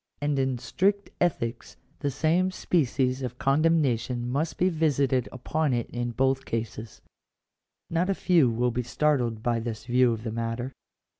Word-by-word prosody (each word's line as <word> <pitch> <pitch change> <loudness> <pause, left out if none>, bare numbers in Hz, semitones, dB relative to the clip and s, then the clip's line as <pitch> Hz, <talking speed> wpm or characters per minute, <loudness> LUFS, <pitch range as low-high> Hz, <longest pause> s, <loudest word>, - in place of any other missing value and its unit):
And 145 -1 0
in 130 -1 0
strict 195 - 0
ethics 125 -9 -1 0.2
the 145 - -1
same 160 +6 +2
species 135 -7 0
of 125 -1 -4
condemnation 135 -5 +1
must 145 +6 -1
be 180 - +3
visited 140 -7 +1
upon 145 +3 -1
it 120 -1 -2
in 120 0 -2
both 135 +3 +1
cases. 115 -1 -5 0.9
§2. - - -6
Not 175 +3 +1
a 195 - +2
few 165 -10 +4
will 120 +2 +1
be 120 +2 -1
startled 120 -2 0
by 120 -1 +1
this 115 -1 -5
view 125 0 +3
of 110 -1 -4
the 115 - -3
matter. 115 +3 -3
130 Hz, 160 wpm, -27 LUFS, 120-155 Hz, 0.9 s, few